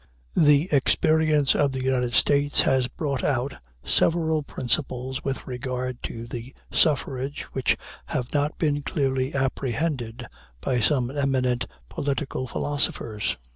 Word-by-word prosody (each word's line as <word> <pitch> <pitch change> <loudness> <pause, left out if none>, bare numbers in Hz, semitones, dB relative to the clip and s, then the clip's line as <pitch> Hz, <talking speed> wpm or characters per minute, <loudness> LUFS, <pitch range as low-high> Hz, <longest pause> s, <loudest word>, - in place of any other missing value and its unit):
The 150 +1 +5
experience 150 +1 +3
of 140 -2 +2
the 130 -1 -3
United 125 -2 +1
States 145 0 +4
has 130 -2 +2
brought 140 0 -3
out 135 0 0 0.3
several 160 -2 +4
principles 130 0 -2
with 135 -1 -3
regard 125 -1 -4
to 115 0 -6
the 120 +2 -7 0.2
suffrage 140 -2 +1
which 130 - +2 0.3
have 125 -1 -3
not 145 +1 0
been 145 -2 +1
clearly 135 -3 -1
apprehended 130 -2 -1 0.3
by 125 - 0
some 125 +1 +1
eminent 130 -3 0 0.2
political 140 -2 -2
philosophers. 115 -6 -2
135 Hz, 120 wpm, -25 LUFS, 125-145 Hz, 0.3 s, The